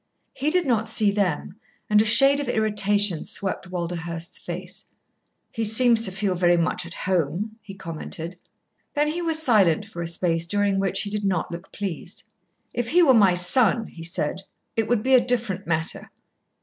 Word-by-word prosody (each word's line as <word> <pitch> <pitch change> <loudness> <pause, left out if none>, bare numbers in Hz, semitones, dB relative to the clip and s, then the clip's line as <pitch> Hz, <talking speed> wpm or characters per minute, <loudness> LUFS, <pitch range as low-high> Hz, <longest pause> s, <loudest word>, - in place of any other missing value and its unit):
He 285 +3 -1
did 360 +1 +1
not 225 -4 0
see 215 -2 +2
them, 200 0 -2 0.3
and 210 0 +4
a - - 0
shade 275 +6 +5
of 285 - -4
irritation 205 -4 +2
swept 190 -1 -4
Walderhurst's 170 -1 -5
face. 180 +1 -8 0.6
"He 225 - -3
seems 225 +1 +4
to 190 - -1
feel 195 0 -1
very 175 -1 +2
much 170 +1 -1
at - - -9
home," 185 +5 -2
he 195 - -11
commented. 165 0 -7 0.6
Then 295 +1 +1
he 340 +3 -3
was 325 -2 +2
silent 210 - +3
for 185 -5 -8
a 170 - -3
space 165 0 0
during 200 +1 0
which 195 -1 0
he 205 - -6
did 210 0 -3
not 190 -4 -1
look 170 +3 -9
pleased. 195 -5 -6 0.5
"If 240 -1 -3
he 350 +5 +4
were 275 -5 +5
my 200 -6 +4
son," 225 +5 +4
he 165 - -11
said, 170 +1 -3 0.3
"it 225 -1 0
would 235 -3 0
be 265 - +1
a 250 -2 +6
different 235 -6 -2
matter. 160 -1 -1
200 Hz, 180 wpm, -23 LUFS, 175-225 Hz, 0.6 s, a